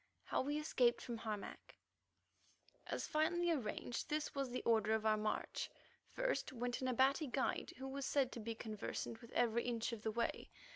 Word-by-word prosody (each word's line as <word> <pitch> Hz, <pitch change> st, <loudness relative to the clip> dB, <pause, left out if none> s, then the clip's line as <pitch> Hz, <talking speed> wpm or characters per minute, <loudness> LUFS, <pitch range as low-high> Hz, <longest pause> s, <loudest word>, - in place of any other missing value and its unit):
HOW -, -, +1 dB
WE 290 Hz, +3 st, 0 dB
ESCAPED 255 Hz, -6 st, +3 dB
FROM 235 Hz, -2 st, -4 dB
HARMAC 215 Hz, -2 st, -5 dB, 1.1 s
As -, -, -1 dB
finally 345 Hz, +3 st, +2 dB
arranged 240 Hz, -4 st, -2 dB
this 305 Hz, 0 st, 0 dB
was 275 Hz, -2 st, -1 dB
the 250 Hz, -, -3 dB
order 220 Hz, -2 st, +4 dB
of 220 Hz, 0 st, +1 dB
our 215 Hz, 0 st, +5 dB
march: 215 Hz, 0 st, -1 dB, 0.4 s
First -, -, 0 dB
went 245 Hz, 0 st, -2 dB
an 260 Hz, -, 0 dB
Abati 265 Hz, +4 st, +4 dB
guide 265 Hz, +1 st, 0 dB
who 265 Hz, +1 st, -5 dB
was 275 Hz, +1 st, -3 dB
said 270 Hz, -3 st, +3 dB
to -, -, -5 dB
be 225 Hz, +1 st, -3 dB
conversant 220 Hz, 0 st, -4 dB
with 235 Hz, -, -11 dB
every 235 Hz, -1 st, +3 dB
inch 235 Hz, -1 st, 0 dB
of 225 Hz, -, -5 dB
the 220 Hz, -, 0 dB
way. 235 Hz, +1 st, -1 dB
245 Hz, 180 wpm, -40 LUFS, 225-275 Hz, 1.1 s, our